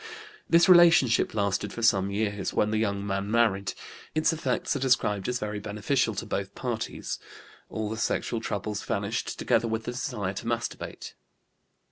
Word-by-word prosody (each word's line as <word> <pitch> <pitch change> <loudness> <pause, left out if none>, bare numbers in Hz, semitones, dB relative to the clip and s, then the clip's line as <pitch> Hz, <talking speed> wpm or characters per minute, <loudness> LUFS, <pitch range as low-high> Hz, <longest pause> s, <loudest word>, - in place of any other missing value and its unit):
This 170 +2 +6
relationship 170 -12 +6
lasted 100 -1 0
for 115 - -6
some 100 -4 +3
years, 100 -1 -2
when 105 - +2
the 110 - +1
young 100 -2 -1
man 100 0 -2
married; 105 -4 +2 0.4
its 155 +1 +3
effects 140 -5 -1
are - - -1
described 125 -6 +1
as 125 - 0
very 105 -2 -4
beneficial 110 +3 0
to - - -4
both 100 0 -4
parties; 120 -3 -4 0.5
all 110 -1 -3
the 110 +1 -4
sexual 110 +1 -1
troubles 105 -1 -3
vanished, - - -2
together 115 - +1
with 110 0 -2
the 120 - -4
desire 105 -6 -3
to 115 - -6
masturbate. 120 0 -4
110 Hz, 160 wpm, -27 LUFS, 100-120 Hz, 0.5 s, This